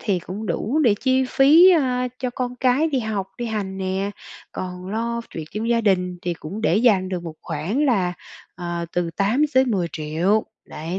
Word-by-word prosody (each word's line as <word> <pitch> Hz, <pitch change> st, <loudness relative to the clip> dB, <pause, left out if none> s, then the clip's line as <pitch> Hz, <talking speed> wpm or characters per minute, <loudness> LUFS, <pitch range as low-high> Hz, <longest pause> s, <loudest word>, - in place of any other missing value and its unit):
thì 195 Hz, -4 st, 0 dB
cũng 195 Hz, +5 st, -7 dB
đủ 260 Hz, +11 st, -1 dB
để 220 Hz, -, +5 dB
chi 260 Hz, 0 st, +2 dB
phí, 310 Hz, +9 st, +7 dB
ơ, 255 Hz, -7 st, +2 dB
cho 250 Hz, -1 st, -2 dB
con 250 Hz, 0 st, -4 dB
cái 260 Hz, +5 st, +2 dB
đi 275 Hz, -4 st, 0 dB
học, 215 Hz, -4 st, -2 dB
đi 240 Hz, -, -3 dB
hành 200 Hz, -3 st, -3 dB
nè, 190 Hz, +1 st, -2 dB, 0.4 s
còn 180 Hz, 0 st, -6 dB
lo 230 Hz, +3 st, -2 dB
chuyện 160 Hz, -, -6 dB
trong 220 Hz, +2 st, -3 dB
gia 235 Hz, -1 st, +3 dB
đình, 180 Hz, -4 st, +1 dB
thì 175 Hz, -1 st, -2 dB
cũng 170 Hz, +7 st, -7 dB
để 190 Hz, -5 st, +2 dB
dành 210 Hz, -5 st, +3 dB
được 180 Hz, -2 st, -3 dB
một 165 Hz, -2 st, -7 dB
khoản 170 Hz, -, -2 dB
là, 190 Hz, -8 st, +2 dB, 0.4 s
ờ, 175 Hz, -1 st, -4 dB
từ 175 Hz, -1 st, -1 dB
8.000.000-10.000.000. 200 Hz, -, +1 dB, 0.2 s
Đấy, 165 Hz, +5 st, -5 dB
205 Hz, 180 wpm, -22 LUFS, 180-250 Hz, 0.4 s, phí